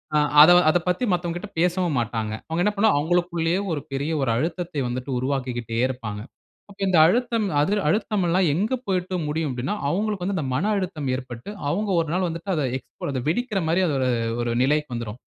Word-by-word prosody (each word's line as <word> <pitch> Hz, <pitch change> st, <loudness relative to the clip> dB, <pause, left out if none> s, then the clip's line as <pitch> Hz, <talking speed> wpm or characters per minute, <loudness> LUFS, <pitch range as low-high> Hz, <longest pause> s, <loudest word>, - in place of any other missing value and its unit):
அ -, -, +5 dB, 0.2 s
அத 160 Hz, +4 st, +9 dB, 0.2 s
அத 155 Hz, -, +4 dB
பத்தி 180 Hz, +7 st, 0 dB
மத்தவங்ககிட்ட 175 Hz, +2 st, -2 dB
பேசவும் 175 Hz, -3 st, +1 dB
மாட்டாங்க. 110 Hz, -2 st, -2 dB, 0.2 s
அவங்க 165 Hz, +2 st, -1 dB
என்ன 210 Hz, -, +2 dB
பண்ணுவாங்க, 210 Hz, -6 st, +3 dB
அவங்களுக்குள்ளேயே 175 Hz, +2 st, 0 dB
ஒரு 150 Hz, -3 st, -2 dB
பெரிய 140 Hz, +3 st, -2 dB
ஒரு 135 Hz, -, 0 dB
அழுத்தத்தை 165 Hz, +4 st, -2 dB
வந்துட்டு 125 Hz, +2 st, -4 dB
உருவாக்கிக்கிட்டே 125 Hz, -4 st, -3 dB
இருப்பாங்க. 110 Hz, -5 st, -5 dB, 0.5 s
அப்ப 200 Hz, -, -16 dB
இந்த 185 Hz, -2 st, +3 dB
அழுத்தம், 230 Hz, +4 st, +1 dB, 0.2 s
அதுல 200 Hz, +6 st, +1 dB
அழுத்தமெல்லாம் 185 Hz, -2 st, +1 dB
எங்க 205 Hz, -, 0 dB
போயிட்டு 185 Hz, -1 st, -1 dB
முடியும் 150 Hz, -1 st, -1 dB
அப்டின்னா, 130 Hz, +10 st, -2 dB
அவங்களுக்கு 205 Hz, +2 st, -1 dB
வந்து, 200 Hz, +1 st, -1 dB
அந்த 155 Hz, -, -2 dB
மன 190 Hz, +10 st, 0 dB
அழுத்தம் 175 Hz, -7 st, -3 dB
ஏற்பட்டு, 125 Hz, -, -8 dB, 0.2 s
அவங்க 205 Hz, +7 st, -1 dB
ஒரு 160 Hz, -, -4 dB
நாள் 185 Hz, +1 st, +1 dB
வந்துட்டு 170 Hz, +4 st, -4 dB
அத 150 Hz, -, 0 dB
எக்ஸ் 130 Hz, 0 st, -6 dB
வெடிக்கற 210 Hz, +2 st, -1 dB
மாரி, 170 Hz, +3 st, +2 dB
அ-ஒரு 135 Hz, -4 st, 0 dB, 0.3 s
ஒரு 120 Hz, 0 st, -1 dB
நிலைக்கு 150 Hz, +2 st, +1 dB
வந்துரும். 115 Hz, -2 st, -5 dB
165 Hz, 175 wpm, -24 LUFS, 135-185 Hz, 0.5 s, அத